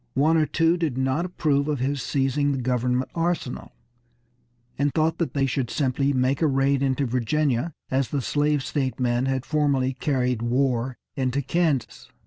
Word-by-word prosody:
One 150 Hz, +5 st, +3 dB
or 155 Hz, -2 st, +3 dB
two 165 Hz, +2 st, +2 dB
did 160 Hz, -7 st, -2 dB
not 130 Hz, +6 st, 0 dB
approve 150 Hz, -5 st, 0 dB
of 150 Hz, -1 st, 0 dB
his 135 Hz, +2 st, -1 dB
seizing 140 Hz, +1 st, 0 dB
the -, -, -2 dB
government 125 Hz, +1 st, 0 dB
arsenal, 165 Hz, -6 st, -2 dB, 1.0 s
and 145 Hz, +1 st, +1 dB
thought 160 Hz, +1 st, 0 dB
they 145 Hz, -5 st, 0 dB
should 130 Hz, -2 st, -1 dB
simply 140 Hz, 0 st, 0 dB
make 130 Hz, +1 st, +1 dB
a 160 Hz, -, +4 dB
raid 135 Hz, 0 st, +2 dB
into 135 Hz, 0 st, +1 dB
Virginia 130 Hz, +4 st, 0 dB, 0.2 s
as 130 Hz, -1 st, +1 dB
the 145 Hz, -, -1 dB
slave 145 Hz, 0 st, +1 dB
state 135 Hz, -3 st, -2 dB
men 125 Hz, +1 st, +1 dB
had 130 Hz, -1 st, -1 dB
formerly 140 Hz, -4 st, +1 dB
carried 125 Hz, -3 st, -1 dB
war 125 Hz, 0 st, 0 dB, 0.2 s
into 135 Hz, +1 st, -1 dB
Kansas. 145 Hz, -5 st, -1 dB
135 Hz, 160 wpm, -24 LUFS, 130-150 Hz, 1.0 s, a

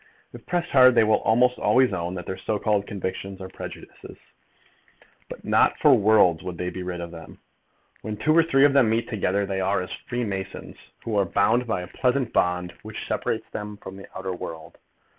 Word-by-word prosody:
If 120 Hz, -1 st, -12 dB
pressed 175 Hz, -1 st, -2 dB
hard 130 Hz, -2 st, +7 dB
they 115 Hz, -, +6 dB
will 110 Hz, 0 st, +3 dB
almost 125 Hz, +3 st, +2 dB
own 95 Hz, -9 st, +2 dB
that 90 Hz, -, -6 dB
their 95 Hz, -, -4 dB
so 105 Hz, +2 st, -2 dB
called 105 Hz, -1 st, 0 dB
convictions 95 Hz, 0 st, -5 dB
are 95 Hz, -1 st, -8 dB
prejudices. -, -, -10 dB, 1.1 s
But -, -, -10 dB
not -, -, +3 dB
for -, -, +5 dB
worlds 100 Hz, -6 st, +4 dB
would 90 Hz, -2 st, -6 dB
they 90 Hz, +1 st, -3 dB
be 95 Hz, -, -6 dB
rid 90 Hz, -1 st, -5 dB
of 85 Hz, -1 st, -7 dB
them. 80 Hz, -1 st, -12 dB, 0.6 s
When 105 Hz, -1 st, -5 dB
two 155 Hz, +8 st, +2 dB
or 165 Hz, -, +7 dB
three 140 Hz, -4 st, +4 dB
of 145 Hz, -, +4 dB
them 135 Hz, -5 st, +4 dB
meet 115 Hz, +1 st, 0 dB
together, 100 Hz, -2 st, -1 dB
they 95 Hz, -1 st, -2 dB
are 95 Hz, +1 st, +1 dB
as 90 Hz, -, -5 dB, 0.2 s
freemasons, 100 Hz, -6 st, -4 dB, 0.3 s
who 115 Hz, -, -3 dB
are 100 Hz, -, +3 dB
bound 115 Hz, +7 st, +1 dB
by 110 Hz, -5 st, -1 dB
a -, -, -8 dB
pleasant 125 Hz, +1 st, -1 dB
bond 90 Hz, 0 st, 0 dB
which -, -, -7 dB
separates -, -, -2 dB
them 105 Hz, 0 st, -6 dB
from 95 Hz, -1 st, -10 dB
the 100 Hz, -, -11 dB
outer 95 Hz, 0 st, -4 dB
world. 80 Hz, -2 st, -8 dB
100 Hz, 200 wpm, -24 LUFS, 95-120 Hz, 1.1 s, hard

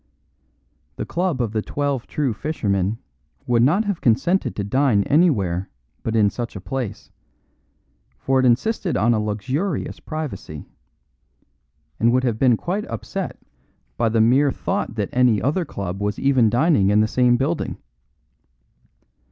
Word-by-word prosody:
The -, -, -4 dB
club 175 Hz, -5 st, -1 dB
of 110 Hz, -, -3 dB
The 110 Hz, -1 st, -1 dB
Twelve 140 Hz, 0 st, -2 dB
True 140 Hz, -6 st, -1 dB
Fishermen 105 Hz, -, -1 dB, 0.5 s
would 120 Hz, -1 st, +2 dB
not 170 Hz, -, +3 dB
have 200 Hz, -4 st, -2 dB
consented 135 Hz, -, +1 dB
to 100 Hz, -, -2 dB
dine 115 Hz, -1 st, +2 dB
anywhere 100 Hz, -, +2 dB, 0.3 s
but 115 Hz, -, -2 dB
in 105 Hz, -2 st, +3 dB
such 120 Hz, -2 st, -5 dB
a -, -, -5 dB
place, 125 Hz, +2 st, -5 dB, 1.1 s
for 135 Hz, 0 st, +1 dB
it 130 Hz, -, +2 dB
insisted 180 Hz, -, +1 dB
on 120 Hz, +2 st, +3 dB
a 110 Hz, -, +1 dB
luxurious 130 Hz, -, -2 dB
privacy; 125 Hz, -, -6 dB, 1.3 s
and 115 Hz, +1 st, +4 dB
would 130 Hz, +1 st, +2 dB
have 115 Hz, -4 st, -1 dB
been 125 Hz, -4 st, +4 dB
quite 190 Hz, -, -3 dB
upset 115 Hz, -3 st, -5 dB, 0.6 s
by 115 Hz, -1 st, +1 dB
the 110 Hz, 0 st, +2 dB
mere 130 Hz, +6 st, +4 dB
thought 115 Hz, -, -3 dB
that 105 Hz, -3 st, -2 dB
any 125 Hz, -4 st, +3 dB
other 155 Hz, -, 0 dB
club 95 Hz, -, -5 dB
was 105 Hz, 0 st, -1 dB
even 130 Hz, -5 st, +3 dB
dining 120 Hz, -, +3 dB
in 105 Hz, +1 st, +4 dB
the 110 Hz, -, +2 dB
same 125 Hz, +1 st, +3 dB
building. 150 Hz, +6 st, -2 dB
120 Hz, 145 wpm, -22 LUFS, 105-145 Hz, 1.3 s, and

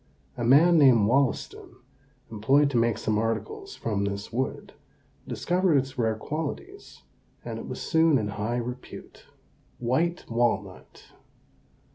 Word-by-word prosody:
A 120 Hz, -, -4 dB
man 160 Hz, +8 st, +5 dB
named 125 Hz, -7 st, +6 dB
Wollaston, 135 Hz, +2 st, -1 dB, 0.6 s
employed 135 Hz, +7 st, +2 dB
to 125 Hz, -, 0 dB
make 115 Hz, -1 st, +2 dB
some 105 Hz, -1 st, -1 dB
articles 115 Hz, -1 st, -4 dB
from 105 Hz, -3 st, -2 dB
this 100 Hz, +2 st, -5 dB
wood, 130 Hz, +3 st, -3 dB, 0.5 s
discovered 180 Hz, -2 st, +1 dB
its 135 Hz, 0 st, -2 dB
rare 110 Hz, -2 st, 0 dB
qualities, 160 Hz, -, -6 dB, 0.4 s
and -, -, -5 dB
it -, -, -8 dB
was -, -, -6 dB
soon 160 Hz, -3 st, +3 dB
in 105 Hz, -3 st, -2 dB
high 105 Hz, +4 st, -3 dB
repute. 125 Hz, +1 st, -8 dB, 0.5 s
WHITE 160 Hz, +9 st, -1 dB
WALNUT. 120 Hz, 0 st, -2 dB
125 Hz, 125 wpm, -26 LUFS, 110-150 Hz, 0.6 s, named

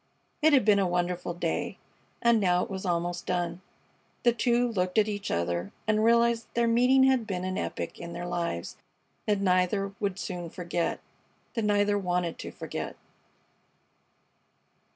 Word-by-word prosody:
It 315 Hz, +1 st, +5 dB
had 265 Hz, -6 st, +5 dB
been 205 Hz, -2 st, +5 dB
a 195 Hz, -, +2 dB
wonderful 175 Hz, 0 st, -1 dB
day, 175 Hz, -, -2 dB, 0.5 s
and 235 Hz, -1 st, +5 dB
now 180 Hz, -3 st, +3 dB
it -, -, -7 dB
was 190 Hz, 0 st, -4 dB
almost 175 Hz, 0 st, -1 dB
done. 175 Hz, -1 st, -1 dB, 0.6 s
The 240 Hz, -, +5 dB
two 240 Hz, +1 st, +2 dB
looked 185 Hz, -1 st, -1 dB
at 215 Hz, -1 st, +5 dB
each 205 Hz, -1 st, -3 dB
other 85 Hz, +2 st, -1 dB, 0.2 s
and 215 Hz, 0 st, +2 dB
realized 235 Hz, 0 st, +3 dB
that -, -, -36 dB
their 235 Hz, 0 st, +3 dB
meeting 250 Hz, +3 st, +5 dB
had 260 Hz, -4 st, +3 dB
been 185 Hz, -3 st, -3 dB
an 185 Hz, 0 st, -2 dB
epoch -, -, -4 dB
in 170 Hz, 0 st, -7 dB
their 175 Hz, -, -5 dB
lives 170 Hz, -, -3 dB, 0.5 s
that 205 Hz, -2 st, +2 dB
neither 195 Hz, +1 st, +2 dB
would 200 Hz, -3 st, -1 dB
soon 175 Hz, -4 st, -5 dB
forget 175 Hz, 0 st, -2 dB, 0.5 s
that 225 Hz, -3 st, -1 dB
neither 205 Hz, 0 st, +2 dB
wanted 180 Hz, -3 st, -1 dB
to -, -, -6 dB
forget. -, -, -5 dB
190 Hz, 160 wpm, -28 LUFS, 175-225 Hz, 0.6 s, It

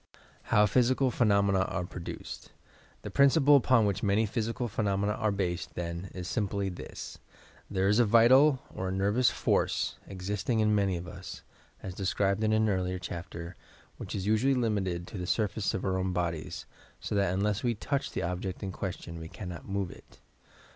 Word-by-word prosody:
HOW 105 Hz, -, +4 dB
PHYSICAL 125 Hz, +5 st, +2 dB
PHENOMENA 100 Hz, -5 st, +3 dB
ARE 95 Hz, -2 st, -3 dB
PRODUCED 90 Hz, -1 st, -8 dB, 0.5 s
The -, -, -6 dB
principle 140 Hz, +1 st, +5 dB
upon 125 Hz, -4 st, +4 dB
which 100 Hz, -3 st, 0 dB
many 105 Hz, +2 st, +2 dB
physical 115 Hz, +2 st, -2 dB
phenomena 100 Hz, -1 st, 0 dB
are 110 Hz, 0 st, 0 dB
based, 95 Hz, -3 st, -2 dB
then, 85 Hz, +2 st, -4 dB
is 90 Hz, -1 st, -5 dB
simply 100 Hz, 0 st, -1 dB
this: 90 Hz, -, -8 dB, 0.5 s
There 95 Hz, 0 st, +1 dB
is 105 Hz, +3 st, +4 dB
a 120 Hz, -, +6 dB
vital 130 Hz, +6 st, +6 dB
or 95 Hz, -, -3 dB
a -, -, -2 dB
nervous 100 Hz, +6 st, +2 dB
force -, -, 0 dB
existing 100 Hz, +4 st, -2 dB
in 105 Hz, -1 st, +3 dB
many 100 Hz, -3 st, +2 dB
of 85 Hz, +1 st, -7 dB
us, 90 Hz, +2 st, -9 dB, 0.4 s
as 95 Hz, -, -5 dB
described 100 Hz, +2 st, 0 dB
in 110 Hz, -, +2 dB
an 110 Hz, 0 st, +3 dB
earlier 95 Hz, -2 st, 0 dB
chapter, 85 Hz, 0 st, -7 dB, 0.4 s
which -, -, -6 dB
is 95 Hz, -, -3 dB
usually 110 Hz, +6 st, +3 dB
limited 100 Hz, -8 st, -1 dB
to 95 Hz, -, -7 dB
the 90 Hz, -, -4 dB
sur 110 Hz, +2 st, +2 dB
face 105 Hz, 0 st, -2 dB
of 95 Hz, -, -3 dB
our 95 Hz, -1 st, 0 dB
own 95 Hz, 0 st, -1 dB
bodies, 85 Hz, -3 st, -3 dB, 0.3 s
so -, -, -5 dB
that 100 Hz, -3 st, +2 dB
unless 100 Hz, +2 st, 0 dB
we 120 Hz, -2 st, 0 dB
touch 140 Hz, +6 st, -2 dB
the -, -, -3 dB
object 90 Hz, +3 st, -3 dB
in 95 Hz, -, -3 dB
question, 90 Hz, -3 st, -5 dB
we 80 Hz, 0 st, -8 dB
cannot 90 Hz, -4 st, -8 dB
move 95 Hz, -2 st, -2 dB
it. -, -, -16 dB
100 Hz, 180 wpm, -29 LUFS, 90-110 Hz, 0.5 s, a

